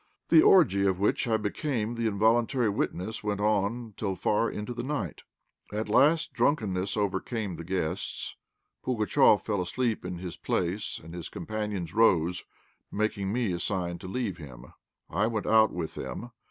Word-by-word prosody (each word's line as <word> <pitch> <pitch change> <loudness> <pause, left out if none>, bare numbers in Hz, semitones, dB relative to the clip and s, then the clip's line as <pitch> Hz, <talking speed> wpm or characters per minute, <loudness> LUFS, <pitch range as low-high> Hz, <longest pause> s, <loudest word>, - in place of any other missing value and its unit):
The 160 -2 +8
orgy 150 - +5
of 95 -1 0
which 105 +4 +1
I 110 -1 +3
became 110 +1 -2
the 115 -1 -1
involuntary 115 +3 +2
witness 100 +1 -2
went 105 -1 -1
on 105 +2 0
till 100 -3 -2
far 105 +4 +1
into 105 +4 -5
the 120 - -4
night. 125 - -3 0.5
At 105 +1 -3
last 155 +8 +4
drunkenness 100 -8 0
overcame 100 0 -2
the 85 - -7
guests; 90 0 -3 0.5
Pugatchéf 110 -3 +4
fell 100 -3 0
asleep 115 +5 -1
in 90 0 -5
his 90 -1 -7
place, 90 +5 -2
and 80 +1 -10
his 85 -2 -6
companions 105 -5 -4
rose, 90 -5 +3 0.5
making 100 -2 -1
me 115 -3 0
a 85 - -2
sign 85 -3 -2
to 95 - -8
leave 100 -3 -2
him. 65 -5 -11 0.3
I 100 +6 +1
went 110 -2 -2
out 110 -1 +5
with 85 -2 -4
them. 65 - -6
105 Hz, 160 wpm, -28 LUFS, 90-115 Hz, 0.5 s, The